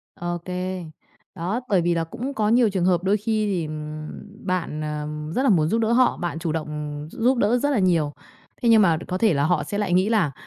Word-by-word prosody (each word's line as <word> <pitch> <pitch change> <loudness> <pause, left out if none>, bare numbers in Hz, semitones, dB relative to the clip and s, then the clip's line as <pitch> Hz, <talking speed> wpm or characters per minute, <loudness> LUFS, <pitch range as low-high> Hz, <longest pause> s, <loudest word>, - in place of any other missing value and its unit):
Ô 175 0 -3
kê. 185 0 -4 0.5
Đó, 190 +7 -2
bởi 190 -3 +3
vì 175 +1 +1
là 165 - 0
cũng 245 - -5
có 215 -5 +1
nhiều 235 0 +4
trường 190 -3 0
hợp 180 -1 +2
đôi 200 +2 +2
khi 215 0 0
thì 180 -6 -1 0.8
bạn, 175 -5 -2
ờm, 150 0 -4
rất 260 - +1
là 275 - +3
muốn 160 -7 +4
giúp 225 +8 +1
đỡ 225 0 +1
họ, 250 +1 +3
bạn 175 -2 -3
chủ 165 -1 -2
động 155 -1 -3 0.4
gi - - -13
giúp 255 +3 +3
đỡ 230 +2 +3
rất 285 +4 0
là 260 - +2
nhiều. 170 -6 +2 0.5
Thế 235 - +2
nhưng 225 -2 +7
mà 170 -5 +4
có 185 - -2
thể 215 0 +3
là 140 -1 +1
họ 175 +2 +1
sẽ 205 - -4
lại 205 -4 0
nghĩ 185 +3 +3
là 205 -10 +2
185 Hz, 240 wpm, -23 LUFS, 165-220 Hz, 0.8 s, nhưng